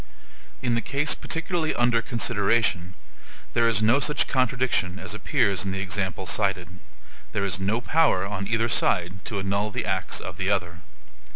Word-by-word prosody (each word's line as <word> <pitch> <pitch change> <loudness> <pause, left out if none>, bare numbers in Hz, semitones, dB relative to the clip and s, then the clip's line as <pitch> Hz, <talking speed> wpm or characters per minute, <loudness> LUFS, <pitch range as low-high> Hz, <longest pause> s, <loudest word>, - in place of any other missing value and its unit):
In 120 -2 +1
the 115 - +1
case 145 +6 +1
particularly 165 -1 -2
under 120 -1 +3
consideration, 105 -6 0 0.6
there 115 -1 +3
is 110 -2 +1
no 120 +6 +4
such 150 0 +1
contradiction 125 -8 +1
as 95 0 -5
appears 100 -2 +1
in 100 - -3
the 95 0 -3
example 95 -1 -2
cited; 90 -2 -1 0.5
there 100 -1 0
is 95 -1 -2
no 105 +5 0
power 145 - +2
on 100 -1 -4
either 115 +1 +1
side 95 -3 0
to 105 - -2
annul 100 +2 -1
the 105 - -3
acts 95 -2 -1
of 90 -3 -7
the 95 0 -1
other. 90 -4 -1
100 Hz, 165 wpm, -25 LUFS, 95-120 Hz, 0.6 s, no